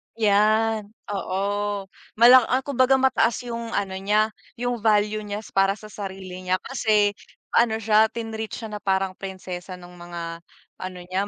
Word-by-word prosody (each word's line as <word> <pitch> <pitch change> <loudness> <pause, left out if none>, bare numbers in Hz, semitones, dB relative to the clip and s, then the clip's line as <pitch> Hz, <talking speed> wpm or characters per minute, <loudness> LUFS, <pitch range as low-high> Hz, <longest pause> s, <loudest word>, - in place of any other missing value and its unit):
Yan, 215 0 +2 0.2
oo. 200 +1 -2 0.3
Mala 240 +2 +8
ah, 260 +1 +1
kumbaga 265 -1 +3
mataas 255 -2 +2
yung 235 -1 -5
ano 190 -1 -2
niya, 210 +3 +2 0.2
yung 245 0 -2
value 210 0 +2
niya 210 0 -5
para 195 0 +3
sa 215 0 -13
sarili 190 -2 -7
niya, 185 0 0
kasi 215 -6 +2 0.4
ano 230 -2 +3
siya, 220 0 +4
tinreat 220 -1 -5
siya 225 -2 -7
na 210 - -5
parang 190 -1 0
prinsesa 185 -1 -7
nung 180 0 -13
mga 170 -1 -6 0.4
ano 185 -1 -6
niya, 185 +3 -2
210 Hz, 150 wpm, -24 LUFS, 190-225 Hz, 0.4 s, Mala